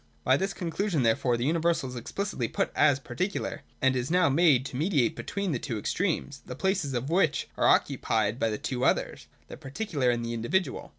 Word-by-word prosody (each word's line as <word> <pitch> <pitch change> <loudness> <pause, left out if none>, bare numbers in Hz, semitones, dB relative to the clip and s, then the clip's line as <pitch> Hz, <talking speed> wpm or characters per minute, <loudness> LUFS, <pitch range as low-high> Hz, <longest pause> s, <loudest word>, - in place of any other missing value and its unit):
By 130 - +4
this 195 +6 -2
con 170 -2 -4
clusion 185 -7 0
therefore 120 +1 +2
the 120 - -2
universal 165 -2 +1
is 125 - -7
explicitly 130 - -3
put - - -1
as 145 -3 +4
particular 135 +10 -3
— - - -35
and 130 0 +4
is 125 +1 -2
now 180 -2 +3
made 140 -3 +4
to 135 - -6
mediate 145 - +1
between 200 -2 -3
the 130 - -1
two 120 -4 -4
extremes, 150 - -2
the - - -8
places 190 -8 -1
of 125 +5 -2
which 170 -4 +2
are - - +2
occupied 110 +1 +1
by 115 - +1
the 105 - -2
two 125 +2 -3
others - - 0 0.2
(the - - -9
particular 140 - -2
and 120 -1 0
the 115 - -3
individual). 120 +12 -1
140 Hz, 210 wpm, -28 LUFS, 120-175 Hz, 0.2 s, By